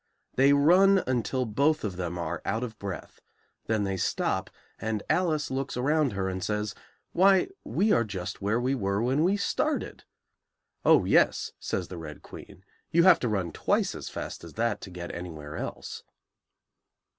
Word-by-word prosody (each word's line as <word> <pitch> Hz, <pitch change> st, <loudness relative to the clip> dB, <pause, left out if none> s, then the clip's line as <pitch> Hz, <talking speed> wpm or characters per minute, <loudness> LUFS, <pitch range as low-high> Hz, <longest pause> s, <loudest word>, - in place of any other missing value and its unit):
They 135 Hz, +2 st, +5 dB
run 180 Hz, +7 st, +5 dB
until 130 Hz, +1 st, 0 dB
both 140 Hz, +8 st, +1 dB
of 100 Hz, -4 st, -3 dB
them 90 Hz, -1 st, -4 dB
are 85 Hz, -1 st, -3 dB
out 115 Hz, +2 st, -1 dB
of 110 Hz, -3 st, -6 dB
breath; 100 Hz, -2 st, -7 dB, 0.5 s
then 110 Hz, -2 st, +1 dB
they 95 Hz, -1 st, -1 dB
stop, 90 Hz, -, -1 dB, 0.3 s
and 110 Hz, -2 st, -2 dB
Alice 160 Hz, -6 st, +1 dB
looks 135 Hz, -1 st, -3 dB
around 145 Hz, 0 st, +2 dB
her 95 Hz, -1 st, -1 dB
and 95 Hz, -1 st, -3 dB
says, 105 Hz, -1 st, -2 dB, 0.4 s
"Why, 190 Hz, -, +4 dB
we 210 Hz, +3 st, +1 dB
are 115 Hz, -, +4 dB
just 95 Hz, -5 st, -6 dB
where 105 Hz, +4 st, +1 dB
we 130 Hz, +2 st, 0 dB
were 100 Hz, -5 st, 0 dB
when 135 Hz, +5 st, +2 dB
we 190 Hz, +4 st, +3 dB
started!" 200 Hz, -, -1 dB, 0.8 s
"Oh, -, -, +5 dB
yes," -, -, +3 dB
says 90 Hz, -, -3 dB
the 90 Hz, -, -7 dB
Red 75 Hz, -2 st, -9 dB
Queen; 95 Hz, -, -12 dB, 0.2 s
"you 170 Hz, +1 st, +4 dB
have 180 Hz, -2 st, +7 dB
to 120 Hz, -, -1 dB
run 95 Hz, -6 st, -1 dB
twice -, -, 0 dB
as -, -, -7 dB
fast -, -, -6 dB
as 85 Hz, -, -10 dB
that 115 Hz, -1 st, -1 dB
to -, -, -8 dB
get 90 Hz, -1 st, -7 dB
anywhere 80 Hz, -4 st, -7 dB
else." -, -, -6 dB
110 Hz, 170 wpm, -28 LUFS, 95-140 Hz, 0.8 s, have